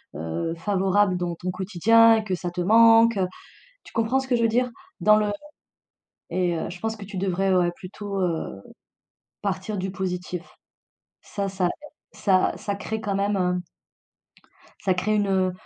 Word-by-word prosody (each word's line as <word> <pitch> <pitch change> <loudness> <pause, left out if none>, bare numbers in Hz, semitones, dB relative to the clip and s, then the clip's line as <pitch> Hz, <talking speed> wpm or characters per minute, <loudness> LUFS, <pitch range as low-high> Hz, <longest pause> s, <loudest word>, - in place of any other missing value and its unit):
heu, 80 - -3
favorable 195 +1 +1
dans 175 -1 -2
ton 180 +2 -5
quotidien, 220 +5 +4
que 190 -3 -2
ça 175 0 -5
te 180 0 -3
manque, 225 +3 +6
heu, 185 -1 +1 0.6
tu - - -16
comprends 230 +4 +1
ce 265 - -5
que 255 - +2
je 230 - +1
veux - - +5
dire? 245 +3 +1 0.3
Dans 210 0 +6
le 210 -1 +1 1.0
et 180 -1 0
heu, 160 - -3
je 180 +1 -9
pense 225 0 -2
que 205 - -10
tu 200 -1 -7
devrais, 190 0 +1
ouais, 175 -1 +3
plutôt, 195 +2 -6
heu, 165 - -2 0.8
partir 200 +1 -3
du 190 0 -3
positif. 180 -2 -4 0.8
Ça 200 -1 -4
ça 190 -2 0 0.4
ça 190 -2 +2
ça 200 - -3
crée 220 +2 -4
quand 205 -3 -2
même 200 +1 0
un 180 -1 0 1.2
ça 190 -2 +3
crée 200 +4 0
une, 205 -1 +1
heu, 185 -1 +1
195 Hz, 170 wpm, -24 LUFS, 180-215 Hz, 1.2 s, manque